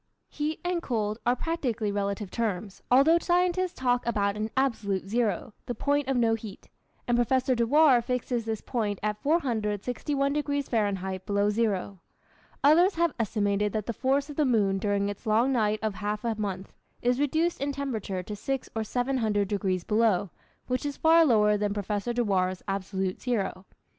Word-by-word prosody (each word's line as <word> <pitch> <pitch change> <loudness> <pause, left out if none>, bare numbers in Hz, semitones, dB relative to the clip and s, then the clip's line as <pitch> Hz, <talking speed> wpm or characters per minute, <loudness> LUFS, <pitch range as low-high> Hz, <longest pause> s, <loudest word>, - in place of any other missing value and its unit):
Heat 300 +1 -3
and 355 -1 0
cold 215 -6 -2
are 245 - +4
practically 245 -8 -2
relative 200 0 -2
terms, 210 -4 -3
although 280 +7 +5
scientists 360 +1 +1
talk 245 -1 +1
about 205 -3 0
an 215 +1 -2
"absolute 215 -8 0
zero" 220 0 -1
(the 245 - -3
point 285 +3 0
of 270 -2 +1
no 230 -2 +3
heat), 220 -3 -7 0.4
and 240 - +2
Professor 255 +2 +2
Dewar 250 +2 +4
fixes 245 -1 -2
this 220 -1 -3
point 215 -5 -2
at 210 0 -2
461 275 - 0
degrees 285 -1 -1
Fahrenheit 190 -4 -1
below 205 0 +2
zero. 205 -3 -1 0.6
Others 340 +7 +5
have 340 -1 +1
estimated 205 -2 0
that 215 -2 -2
the 235 - -3
force 275 +5 0
of 295 - -9
the 305 - +3
moon 205 -7 +2
during 200 0 0
its 205 +3 -6
long 230 +5 +3
night 215 -4 +1
of 215 -2 0
half 210 +1 -3
a 230 - +1
month, 200 -3 -5 0.3
is 245 +1 +2
reduced 315 +3 0
in 285 +1 0
temperature 225 -10 -3
to 210 +3 -6
six 270 +5 -3
or 220 - 0
seven 250 +4 -1
hundred 205 -4 0
degrees 190 -3 -1
below, 210 -4 +2 0.3
which 255 0 -2
is 290 -1 -3
far 330 +1 +6
lower 210 -7 +4
than 205 0 -1
Professor 205 +3 -2
Dewar's 190 -6 0
absolute 190 -1 -2
zero. 195 -6 -2
225 Hz, 170 wpm, -27 LUFS, 205-270 Hz, 0.6 s, far